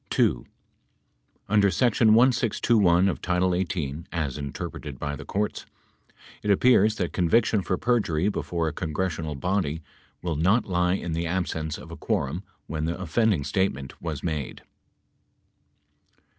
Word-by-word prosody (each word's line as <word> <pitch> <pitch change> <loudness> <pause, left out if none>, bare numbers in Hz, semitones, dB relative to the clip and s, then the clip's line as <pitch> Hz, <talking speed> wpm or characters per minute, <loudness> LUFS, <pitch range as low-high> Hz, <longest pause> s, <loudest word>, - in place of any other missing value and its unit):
(2) - - +1 1.0
Under 100 -1 +4
section 110 +3 +4
1621 115 -6 +3
of 95 - -2
title 90 0 +1
18, 85 -4 -2
as 80 -6 -2
interpreted 70 -1 -6
by 70 +3 -3
the - - -9
courts, 105 +1 -2 0.7
it 105 - -3
appears 110 0 +4
that 90 -5 -2
conviction 105 +4 +2
for 95 0 -1
perjury 100 -8 +1
before 85 -5 -1
a 80 - -2
congressional 80 -2 -3
body 85 -2 -1 0.4
will 85 -3 -1
not 95 +10 +2
lie 90 -1 +1
in 85 -3 -4
the 85 +1 -1
absence 80 -3 -2
of - - -11
a - - -8
quorum - - -1 0.2
when 80 -1 -3
the 85 +3 -3
offending 95 -1 +1
statement 70 -5 -2
was 80 -4 -4
made. 75 -6 -4
90 Hz, 135 wpm, -26 LUFS, 80-100 Hz, 1.0 s, Under